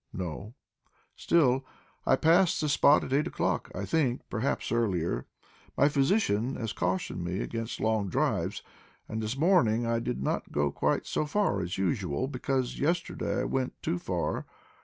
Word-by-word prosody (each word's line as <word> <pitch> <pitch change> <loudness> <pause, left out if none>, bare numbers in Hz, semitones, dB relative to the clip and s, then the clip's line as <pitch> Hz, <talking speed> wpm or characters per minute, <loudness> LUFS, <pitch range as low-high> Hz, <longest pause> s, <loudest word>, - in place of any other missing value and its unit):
"No." 95 +6 -5 0.6
"Still, 135 -6 +3 0.4
I - - +6
passed 170 +5 +4
this 150 -2 +1
spot 145 +1 +5
at 130 - -4
eight 145 +2 +2
o'clock; - - -1
I 100 - -3
think, 130 - 0
perhaps, 120 +4 -1
earlier. 95 -8 0 0.5
My 140 - +5
physician 135 - +1
has 115 -3 -3
cautioned 90 -1 -2
me 90 +2 -2
against 115 0 -4
long 110 -3 +1
drives, - - 0 0.4
and 110 +1 -3
this 110 +4 -3
morning 135 - +3
I 115 0 +1
did 125 +1 -3
not - - -2
go 75 -1 +1
quite - - 0
so 155 - -1
far 155 - +1
as 90 +1 -3
usual, 95 - -1
because 130 -1 -2
yesterday 170 +4 -1
I - - -1
went 130 -1 -2
too 90 - -1
far. - - -2
120 Hz, 160 wpm, -29 LUFS, 100-140 Hz, 0.6 s, I